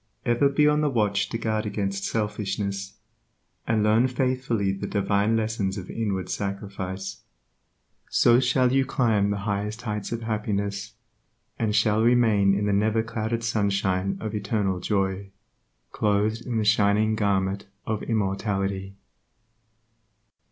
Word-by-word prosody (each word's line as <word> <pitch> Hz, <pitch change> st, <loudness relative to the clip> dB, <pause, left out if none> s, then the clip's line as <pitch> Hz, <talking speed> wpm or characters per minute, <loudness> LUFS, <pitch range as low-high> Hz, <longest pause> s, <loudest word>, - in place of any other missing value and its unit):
Ever 120 Hz, +3 st, +3 dB
be 150 Hz, +2 st, +3 dB
on 150 Hz, 0 st, +3 dB
the 150 Hz, -, +2 dB
watch 105 Hz, -5 st, +1 dB
to 115 Hz, -, -2 dB
guard 110 Hz, -2 st, -1 dB
against 100 Hz, -1 st, -2 dB
selfishness, 100 Hz, -2 st, -2 dB, 0.7 s
and 110 Hz, -2 st, +2 dB
learn 110 Hz, +4 st, +4 dB
faithfully 125 Hz, -5 st, 0 dB
the 95 Hz, -, -4 dB
divine 100 Hz, +2 st, +1 dB
lessons 110 Hz, -3 st, -1 dB
of 95 Hz, -2 st, -7 dB
inward 100 Hz, -5 st, -2 dB
sacrifice; 100 Hz, 0 st, -5 dB, 0.9 s
so 120 Hz, 0 st, +5 dB
shall 125 Hz, 0 st, +2 dB
you 135 Hz, 0 st, +4 dB
climb 110 Hz, -6 st, +1 dB
the 100 Hz, -, -1 dB
highest 105 Hz, +2 st, -2 dB
heights 105 Hz, -3 st, -4 dB
of 115 Hz, 0 st, -3 dB
happiness, 100 Hz, -2 st, -2 dB, 0.6 s
and 110 Hz, -2 st, 0 dB
shall 110 Hz, 0 st, +3 dB
remain 110 Hz, -5 st, +4 dB
in 100 Hz, +1 st, 0 dB
the 105 Hz, -, +1 dB
neverclouded 110 Hz, +2 st, 0 dB
sunshine 100 Hz, -3 st, 0 dB
of 110 Hz, -1 st, -4 dB
universal 100 Hz, -3 st, -1 dB
joy, 95 Hz, 0 st, -1 dB, 0.6 s
clothed 105 Hz, +3 st, 0 dB
in 120 Hz, -2 st, -1 dB
the 110 Hz, -, +1 dB
shining 105 Hz, +1 st, +3 dB
garment 100 Hz, -2 st, 0 dB, 0.2 s
of 110 Hz, -1 st, -2 dB
immortality. 95 Hz, -2 st, -2 dB
105 Hz, 130 wpm, -25 LUFS, 100-115 Hz, 0.9 s, so